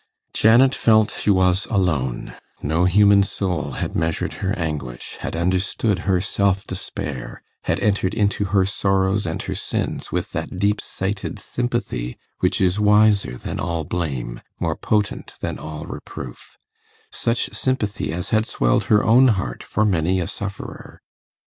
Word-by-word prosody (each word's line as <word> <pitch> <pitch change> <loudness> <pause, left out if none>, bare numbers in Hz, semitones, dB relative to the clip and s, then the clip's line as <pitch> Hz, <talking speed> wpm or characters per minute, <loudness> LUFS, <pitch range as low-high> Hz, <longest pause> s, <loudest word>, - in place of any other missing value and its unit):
Janet 120 +4 +5
felt 110 -1 +4
she - - -2
was 95 0 +3
alone: 80 - 0 0.3
no 80 +4 +2
human 100 +2 +6
soul 95 -5 -2
had - - -3
measured 80 0 -1
her 95 - 0
anguish, 75 -8 -4
had - - -4
understood 95 +3 0
her 95 -1 +4
self 100 +1 +1
despair, 70 -3 -5 0.2
had - - +1
entered 100 -1 +1
into 105 -1 +1
her 95 0 +3
sorrows 95 0 +1
and 80 - -3
her - - -3
sins - - -3
with - - -2
that - - -4
deep 100 +2 +1
sighted 95 +1 -3
sympathy 120 - -3 0.2
which - - +1
is 95 +1 +2
wiser 105 -7 +4
than - - -5
all 85 -1 -1
blame, 70 -8 -3 0.2
more - - 0
potent 105 -2 -1
than - - -3
all 75 -1 -6
reproof 65 -3 -9 0.5
such 115 +1 -1
sympathy 120 -10 -1
as 90 +2 -4
had 110 0 +2
swelled - - +1
her 105 -1 +4
own 125 +4 +6
heart 95 - 0
for 110 - 0
many 90 -1 +2
a 90 - 0
sufferer. 100 +3 -7
95 Hz, 150 wpm, -22 LUFS, 85-105 Hz, 0.5 s, human